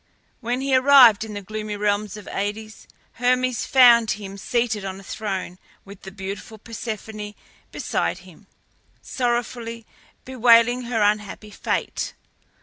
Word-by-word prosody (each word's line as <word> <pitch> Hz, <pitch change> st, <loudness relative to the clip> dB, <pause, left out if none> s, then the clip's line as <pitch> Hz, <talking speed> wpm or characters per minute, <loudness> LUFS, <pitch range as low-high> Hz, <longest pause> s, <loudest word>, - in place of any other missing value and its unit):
When 245 Hz, +1 st, -2 dB
he 270 Hz, -1 st, +1 dB
arrived 255 Hz, -5 st, +7 dB
in 215 Hz, -2 st, -8 dB
the 205 Hz, -, -6 dB
gloomy 215 Hz, +1 st, -5 dB
realms 205 Hz, 0 st, -1 dB
of 210 Hz, -, -11 dB
Aïdes, 215 Hz, +2 st, -5 dB, 0.3 s
Hermes 250 Hz, 0 st, +1 dB
found 240 Hz, -4 st, +6 dB
him 200 Hz, -1 st, -4 dB
seated 230 Hz, 0 st, -1 dB
on 190 Hz, 0 st, -6 dB
a -, -, -13 dB
throne 190 Hz, -3 st, -5 dB, 0.3 s
with 200 Hz, -1 st, -13 dB
the 190 Hz, -, -9 dB
beautiful 200 Hz, +3 st, -7 dB
Persephone 215 Hz, -1 st, -7 dB, 0.4 s
beside -, -, -2 dB
him, -, -, -17 dB, 0.6 s
sorrowfully 235 Hz, -2 st, -3 dB, 0.4 s
bewailing 245 Hz, -1 st, +4 dB
her 230 Hz, -3 st, 0 dB
unhappy 210 Hz, 0 st, -1 dB
fate. -, -, -3 dB
220 Hz, 130 wpm, -23 LUFS, 205-240 Hz, 0.6 s, arrived